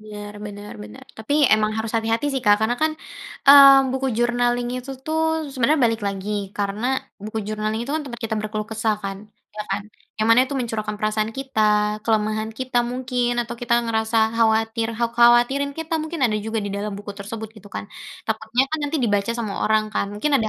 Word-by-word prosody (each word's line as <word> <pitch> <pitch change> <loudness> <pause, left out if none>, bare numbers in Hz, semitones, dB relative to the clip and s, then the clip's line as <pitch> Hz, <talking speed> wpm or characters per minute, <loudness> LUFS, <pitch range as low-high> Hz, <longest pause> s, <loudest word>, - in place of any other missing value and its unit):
Biar 210 -1 -9
bener 205 0 -9
bener, 105 0 -11
tapi 285 +7 +1
emang 215 0 +1
harus 220 0 -3
hati-hati 225 +3 0
sih 265 - -1
Kak, 205 -1 +6
karena 225 - +1
kan, 315 - +2 0.6
eee, 275 -1 +10
buku 265 0 -1
journaling 240 0 +1
itu 255 +2 -8
tuh 315 0 -1 0.3
sebenarnya 265 +3 +2
balik, 225 -1 +1
lagi 200 +1 -5 0.3
karena 205 +3 -2 0.4
buku 215 +1 -4
journaling 215 +1 -2
itu 275 - -4
kan 315 - 0
tempat 240 -3 -6
kita 225 - -4
berkeluh 215 0 -3
kesah 220 -1 0
kan, 195 0 -3 0.4
iya 210 - -7
kan? 200 +1 -1 0.3
Yang 215 - 0
mana 230 +2 +7
itu 280 - -4
mencurahkan 220 -4 -3
perasaan 215 0 0
kita, 265 -4 -3 0.4
kelemahan 215 -1 0
kita 255 -1 0
mungkin 245 0 -1
atau 235 - -7
kita 235 -1 +1
ngerasa 220 0 -1 0.2
khawatir, 225 0 +2
kha 235 - +1
khawatirin 240 +4 +4
kita 325 0 -3
mungkin 315 +1 -5
ada 230 - +2
juga 220 +2 -3
di 200 - -4
dalam 205 +1 -3
buku 205 0 -7
tersebut 215 +2 -7
gitu 205 -1 -13
kan. - - -6 0.4
Takutnya 220 +3 0
kan 315 - 0
nanti 315 - -1
dibaca 205 0 +1
sama 225 -4 -3 0.2
orang 215 0 +1
kan, 200 - 0
mungkin 215 +9 -1
ada 225 -6 +2
225 Hz, 190 wpm, -22 LUFS, 215-245 Hz, 0.6 s, eee